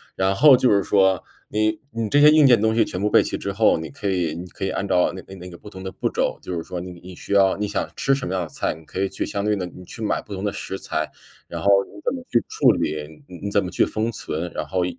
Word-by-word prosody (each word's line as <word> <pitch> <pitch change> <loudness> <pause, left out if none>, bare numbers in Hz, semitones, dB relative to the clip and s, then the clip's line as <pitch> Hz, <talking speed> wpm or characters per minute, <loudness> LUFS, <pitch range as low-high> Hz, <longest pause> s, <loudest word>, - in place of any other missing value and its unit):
然 95 +1 +1
后 135 +5 +7
就 125 - +3
是 100 -1 +4
说， 95 -2 +2 0.3
你 110 0 0
你 115 -2 -3
这 145 - +4
些 150 +1 +8
硬 155 -3 +6
件 120 -4 +6
东 110 +1 +2
西 115 -1 +4
全 90 - -5
部 105 - +1
备 - - +5
齐 - - -3
之 - - -4
后， - - +4
你 80 -1 -6
可 100 +8 -4
以 85 -5 0
你 90 +2 -7
可 95 - -6
以 - - -1
按 100 - -3
照 90 -2 +2
那 95 - -7
个 95 - -12
那 90 0 -10
个 90 - -10
不 105 - -12
同 95 -2 -10
的 95 - -5
步 - - -2
骤， - - -1
就 90 - -5
是 85 - -3
说 90 - -6
你 90 - -7
你 90 0 -11
需 100 - -5
要 95 -1 +4
你 105 - -1
想 100 - -2
吃 135 - +2
什 135 -2 -4
么 - - -3
样 95 - 0
的 85 - -5
菜， - - -2
你 80 - -14
可 95 - -7
以 95 - +1
去 - - -4
相 100 0 -3
对 105 - +2
地， 95 - -3
你 90 +1 -12
去 115 - -10
买 105 - 0
不 105 - -9
同 95 +1 -5
的 105 - 0
食 95 0 -6
材， - - -3 0.4
然 - - -6
后 100 - +2 0.2
你 - - -18
怎 245 - 0
么 255 - -7
去 120 - +3
处 - - +4
理， 75 0 -3
你 90 -1 -10
你 100 - -2
怎 100 - +2
么 90 - -4
去 - - +2
封 110 +2 -2
存， 85 -4 -4
然 - - -3
后 90 -2 0
95 Hz, 330 characters per minute, -22 LUFS, 90-110 Hz, 0.4 s, 些